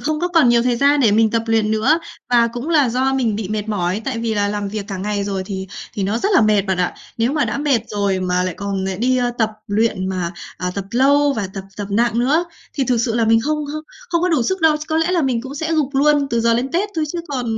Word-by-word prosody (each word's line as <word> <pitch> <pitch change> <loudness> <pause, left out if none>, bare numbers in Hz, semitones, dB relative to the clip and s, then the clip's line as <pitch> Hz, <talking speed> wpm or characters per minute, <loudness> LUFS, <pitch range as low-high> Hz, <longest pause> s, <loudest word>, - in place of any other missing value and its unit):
không 305 0 -1
có 355 - 0
còn 330 -7 +4
nhiều 235 0 +4
thời 245 -1 +1
gian 280 +3 +3
để 230 -5 +4
mình 220 0 +4
tập 230 0 0
luyện 225 -1 +1
nữa, 220 +9 +3 0.3
và 240 -1 +5
cũng 245 +5 -5
là 300 -6 +3
do 260 +3 +1
mình 235 -6 0
bị 210 -3 -4
mệt 215 0 -3
mỏi 195 0 -1
tại 260 -4 -2
vì 230 -1 -1
là 205 -1 +1
làm 205 -1 -3
việc 205 0 -4
cả 195 - -4
ngày 205 +1 -2
rồi 195 -1 -2
thì 190 -1 -5 0.3
thì 200 - -3
nó 205 +4 0
rất 395 - 0
là - - +6
mệt 210 -2 +3
bạn 190 -2 -1
ạ. 180 - 0 0.2
Nếu 230 +4 +1
mà 295 -1 +1
đã - - -2
mệt 285 -5 +2
rồi 200 -2 -1
mà 180 0 0
lại 185 -1 -2
còn 200 -1 -3
lại 190 -1 -2
đi, 255 +3 +2
ơ, 245 -1 +1
tập 220 -2 +2 0.2
luyện 205 -2 0
mà, 180 -2 -2 0.2
ờ, 180 - -3
tập 200 - -3
lâu 280 +4 +3
và 210 -7 -2
tập 195 -1 -6
tập 205 - -4
nặng 235 +2 +1
nữa, 285 +8 +2 0.3
thì 275 - 0
thực 250 -1 +1
sự 230 0 0
là 230 -1 +2
mình 225 0 +4
không 300 +5 -1
không 310 0 -5 0.3
không 340 -4 0
có 365 - +2
đủ 315 -8 +2
sức 375 +9 -1
đâu. 320 -2 +4
Ch - - -11
có 315 - 0
lẽ 325 +2 +1
là 345 - +2
mình 255 -4 0
cũng 265 +3 -8
sẽ 320 +3 -2
gục 295 -3 0
luôn 290 +1 +3
từ 235 - +1
giờ 230 0 +3
đến 245 +3 0
Tết 375 +5 0
thôi, 315 - +1
chứ 345 - -3
còn, 260 -4 -3
235 Hz, 290 wpm, -19 LUFS, 205-285 Hz, 0.3 s, là